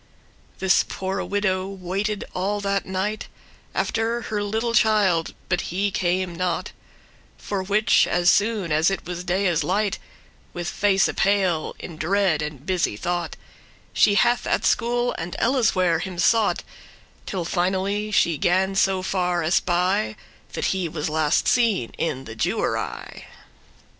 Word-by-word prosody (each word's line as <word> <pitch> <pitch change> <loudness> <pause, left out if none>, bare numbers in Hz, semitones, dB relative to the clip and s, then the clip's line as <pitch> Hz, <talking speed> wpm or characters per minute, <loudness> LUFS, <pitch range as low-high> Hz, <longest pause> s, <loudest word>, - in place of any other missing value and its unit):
<10> - - -32
This 190 0 +3
poore 190 +1 -4
widow 190 -2 -1
waited 195 +2 -3
all 200 +3 -1
that 200 -1 -1
night 190 +3 -2 0.5
After 230 +1 0
her 210 -1 -2
little 220 +3 -1
child, 210 -8 +2
but 180 -1 0
he 195 +3 0
came 180 0 0
not; 180 +1 -2 0.7
For 200 -2 -3
which, 200 +1 +3
as 175 0 +3
soon 205 -5 +1
as 155 +3 +3
it 195 - -4
was 180 0 -5
daye's 180 -2 +1
light, 200 +2 0 0.5
With 175 -1 -4
face 195 0 +2
pale, 190 -5 +1
in 165 - -9
dread 175 -1 +1
and 150 -2 -6
busy 180 - 0
thought, 175 +4 -2 0.6
She 205 - +4
hath 240 +4 +2
at - - 0
school 240 +1 +1
and 170 +1 -5
elleswhere 190 -9 +2
him 180 +1 -5
sought, 220 +4 +2 0.6
Till 185 -4 -3
finally 190 +4 -1
she 170 -7 +2
gan 190 +2 +2
so 190 -1 +2
far 180 -2 0
espy, 175 - +1 0.4
That - - -2
he 185 -3 -2
was 150 -1 -3
last 155 0 +1
seen 220 - +2
in 135 -5 -2
the 115 - -8
Jewery. 110 - -3
190 Hz, 140 wpm, -23 LUFS, 175-205 Hz, 0.7 s, She